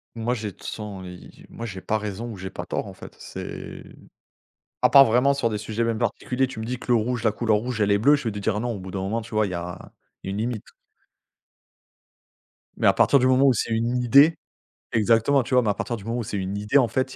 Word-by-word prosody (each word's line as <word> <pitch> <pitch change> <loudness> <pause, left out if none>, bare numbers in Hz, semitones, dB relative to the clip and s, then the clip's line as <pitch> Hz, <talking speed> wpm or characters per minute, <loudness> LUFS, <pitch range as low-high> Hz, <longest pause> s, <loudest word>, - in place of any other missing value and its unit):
Moi 115 +2 -1
j'ai 105 -4 -4
toute - - -20
façon 100 -3 -6
i 90 0 -12
moi 115 - -7
j'ai 100 -4 -6
pas 110 +3 -1
raison 105 +2 -5
ou 110 - -7
j'ai 95 0 -7
pas - - -7
tort - - -3
en - - -9
fait. - - -12
C'est - - -9 0.9
à - - +6
part 135 +1 +9
vraiment 125 +4 +3
sur 120 -4 0
des 105 - -2
sujets 110 +2 -3
même 115 -1 0
particuliers, 130 +3 -1
tu 125 -4 -8
me - - -4
dis 125 +2 -4
que 125 - -2
le - - +5
rouge, 115 +1 -1
la 110 - +3
couleur 110 -1 +1
rouge 120 +1 -3
elle 105 -1 +2
est 100 - +4
bleue, 140 +8 +5
je 145 - -1
vais 115 - 0
te 105 - -6
dire: 105 +1 -1
«Non», 120 +1 -2
au 100 - -6
bout 95 0 -9
d'un 95 - -3
moment 105 +5 -2
tu 110 0 -10
vois 110 -1 +2
il - - -5
y 90 - -4
a 85 0 -7 0.3
une 95 +1 -4
limite. 115 -1 -3 2.1
Mais - - +2
à - - +6
partir 140 - +4
du 130 - +3
moment 130 +1 +4
où 130 - +5
c'est 115 - -2
une 115 +2 0
idée 140 +6 +5 0.5
exactement 115 +5 +3
tu 130 - -6
vois, 125 -1 +5
mais 110 - 0
à 100 - +2
partir 120 +3 -4
du 100 - -12
moment 115 +2 -2
où 120 - -2
c'est 100 - -4
une 95 +1 -3
idée 105 +7 +2
en 130 -4 +4
fait 130 +2 -2
il - - -11
115 Hz, 265 wpm, -24 LUFS, 105-125 Hz, 2.1 s, part